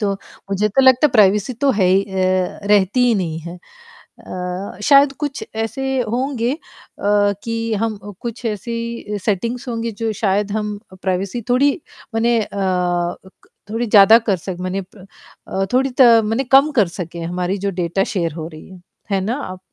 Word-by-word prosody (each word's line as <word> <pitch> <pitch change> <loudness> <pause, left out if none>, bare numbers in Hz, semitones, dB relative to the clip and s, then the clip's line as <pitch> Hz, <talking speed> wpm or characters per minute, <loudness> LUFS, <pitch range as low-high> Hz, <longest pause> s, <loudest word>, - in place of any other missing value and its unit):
तो, 200 -2 0 0.4
मुझे 200 +2 +1
तो 270 +6 +3
लगता 260 +1 +6
है - - -9
प्राइवेसी 210 +1 +3
तो 275 +4 +1
है 200 -6 +2
ही 190 +2 +4
अ, 185 -1 -1
रहती 205 +4 +3
ही 240 - +3
नहीं 165 -5 -2
है। 170 +2 -8 0.4
अ, 180 +2 -7
शायद 280 +3 +6
कुछ 290 -2 -3
ऐसे 265 +4 -2
होंगे 245 0 -1
अ, - - -7 0.9
कि 230 0 -2
हम 225 -2 -1
अ, 205 - -8
कुछ 235 0 -6
ऐसी 230 0 -4
सेटिंग्स 235 +5 -1
होंगी 230 -1 -3
जो 225 - +1
शायद 205 0 +1
हम 210 -1 -2
अ, 185 - -12
प्राइवेसी 195 +5 -2
थोड़ी 270 +4 +4 0.4
मने 230 +1 +2
अ, 210 - -4
अ, 180 -2 0
क 190 - -22 0.2
थोड़ी 225 +3 -1
ज़्यादा 210 +1 +8
कर 200 - +3
सक 180 +1 -6
मने 185 +2 -2
प 190 +1 -15 0.4
अ, 195 0 -1
थोड़ी 265 +2 +3
त - - +8 0.2
मने 225 +5 0
कम 275 +3 +6
कर 215 -7 +4
सके 170 -1 -5
हमारी 180 +3 -2
जो - - +2
डेटा 175 +3 0
शेयर 170 -5 -1
हो 160 0 -6
रही 155 -1 -12
है, 185 -2 -13 0.3
है 195 - +2
ना? 220 +6 -1
आप 185 -10 -6
210 Hz, 185 wpm, -19 LUFS, 185-235 Hz, 0.9 s, ज़्यादा